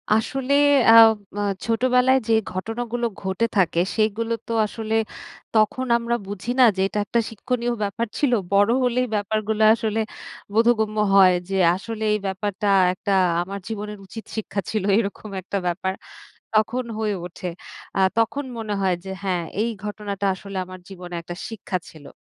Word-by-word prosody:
আসলে 265 +5 -1 0.4
আম 225 0 +10 0.3
আ - - 0 0.2
ছোটবেলায় 250 +3 +3
যে 225 - +3 0.2
ঘটনাগুলো 235 +5 -3 0.2
ঘটে 190 +4 0
থাকে, 170 -3 +2 0.2
সেগুলো 225 +1 0
তো 230 - -2
আসলে 220 +1 -5 0.6
তখন 220 +4 +2
আমরা 235 0 -1
বুঝি 205 +3 -6
না - - +8
যে, 190 - -1
এটা 210 - -3
একটা 235 +4 +1
শিক্ষণীয় 240 +2 -2
ব্যাপার 230 +4 -2
ছিল। 285 -4 +2 0.2
বড় 200 +2 +4
হলেই 250 +1 +1
ব্যাপারগুলো 215 +1 0
আসলে 225 -1 -1 0.5
বোধগম্য 220 -1 +2 0.2
হয় 185 -2 +7 0.2
যে, 195 - -2 0.2
আসলে 220 +3 -6
এই 210 - 0
ব্যাপারটা 205 +2 -2 0.3
একটা 200 +2 -4 0.3
আমার 195 +3 -5
জীবনের 210 -1 -5
উচিত 220 +3 -9
শিক্ষা 215 -2 -3
ছিল, 215 -3 -1
এরকম 215 0 -3
একটা 200 +2 -3
ব্যাপার 190 +2 -1 0.6
তখন 235 +4 +2
হয়ে 215 -2 0
ওঠে। 180 +1 -8 0.5
আ - - +1 0.2
তখন 275 +6 +1
মনে 220 -2 -4
হয় 190 -2 +2
যে 190 - -6
হ্যাঁ, 185 -3 -1 0.2
এই 230 +2 +1
ঘটনাটা 205 -1 -3
আসলে 195 +1 -9
আমার 185 0 -10
জীবনে 180 -2 -9
একটা 175 +1 -7
শিক্ষা 210 -4 -4
ছিল। 150 -3 -13
215 Hz, 155 wpm, -23 LUFS, 195-230 Hz, 0.6 s, আম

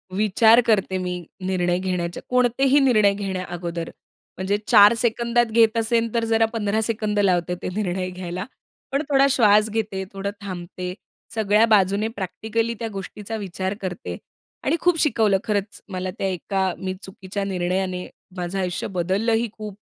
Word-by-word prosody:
विचार 220 +3 +5
करते 195 -4 +2
मी, 180 -1 -4 0.2
निर्णय 180 -1 +1
घेण्याच्या 180 -2 -3
कोणतेही 250 +3 +3
निर्णय 215 -7 +4
घेण्या 190 -2 -3
अगोदर 170 -1 -4 0.5
म्हणजे 190 +2 0
4 205 +2 +8
सेकंदात 235 +1 +2
घेत 225 0 +3
असेल 230 0 +1
तर 230 -1 +1
जरा 225 0 +3
15 215 0 0
सेकंद 215 -2 -1
लावते 180 -2 +2
ते - - -3
निर्णय 185 -3 -1
घ्यायला. 180 0 -5 0.5
पण 275 +2 +1
थोडा 275 -1 +5
श्वास 215 -3 +4
घेते, 205 -3 -2
थोडं 200 +1 -3
थांबते, 180 -1 -6 0.4
सगळ्या 215 +1 +4
बाजूने 205 0 +3
प्रॅक्टिकली 225 +2 -3
त्या 230 - -3
गोष्टीचा 205 +3 -6
विचार 190 -1 -3
करते 175 - -5 0.5
आणि 295 - +2
खूप 350 -2 +3
शिकवलं 220 -9 +3
खरंच 205 -2 -2
मला 185 0 -3
त्या 195 - -1
एका 190 0 -1
मी 185 -1 -3
चुकीच्या 190 +1 -6
निर्णयाने, 185 -1 -2 0.3
माझं 180 +2 -3
आयुष्य 180 -1 -2
बदललंही 205 +6 0
खूप, 210 -2 -8
200 Hz, 150 wpm, -23 LUFS, 185-225 Hz, 0.5 s, 4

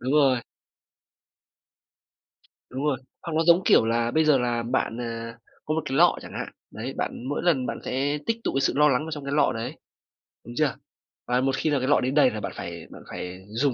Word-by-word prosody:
Đúng 130 +3 -1
rồi. 135 -5 +4 2.3
Đúng 135 +3 -4
rồi. 140 -4 +1 0.2
Hoặc 170 - -5
nó 160 - +4
giống, 170 +2 +6
kiểu - - +6
là, 115 +1 +1
bây 155 +4 +3
giờ 150 -3 +5
là 120 -1 0
bạn, 120 -1 -1
à, 115 -1 -5 0.3
có 155 - -1
một 160 - +1
cái 135 - -2
lọ 175 +2 +6
chẳng - - -10
hạn. - - -4 0.3
Đấy, - - -5
bạn 120 - -3
mỗi 145 - -2
lần 140 -8 +2
bạn - - -3
sẽ 140 +3 0
tích 230 - +1
tụ - - 0
cái 135 - +2
sự 140 - +2
lo 150 0 +6
lắng 130 0 +2
vào 160 - -6
trong 150 -3 -5
cái 140 - -3
lọ 145 -1 +3
đấy, 120 +7 -4 0.7
đúng - - -8
chưa? - - +2 0.5
Và 125 +1 +2
một 135 0 +1
khi 155 - 0
là 145 -2 +2
cái 130 - -1
lọ 145 - +5
đấy 130 +1 0
đầy 140 -3 +5
là 110 - -4
bạn - - -4
phải - - -7
bạn - - -11
phải 90 +1 -7
dùng 125 +4 +1
135 Hz, 230 wpm, -26 LUFS, 120-150 Hz, 2.3 s, giống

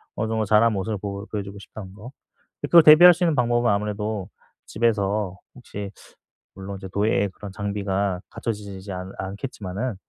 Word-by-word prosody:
어느 110 - -2
정도 110 -1 0
잘 105 +1 +4
한 115 - +4
모습을 105 +2 -2
보 100 0 -5
보여 100 +1 -7
보여주고 100 -1 -5
싶다는 100 -1 -10
거. 110 +5 -11 0.5
그걸 170 -1 +6
대비할 160 +4 +9
수 180 - -2
있는 165 -2 +3
방법은 120 -1 +2
아무래도 105 -1 -2 0.4
집에서 105 -3 0 0.2
혹시 105 -5 -7 0.7
물론 95 +1 -7
이제 95 - -8
도예의 100 +1 +1
그런 100 +1 -10
장비가 100 -2 -2
갖춰지지 100 -4 -5
지 100 +1 -8
않 90 +1 -6
않겠지만은 105 +2 -5
105 Hz, 375 characters per minute, -24 LUFS, 100-110 Hz, 0.7 s, 대비할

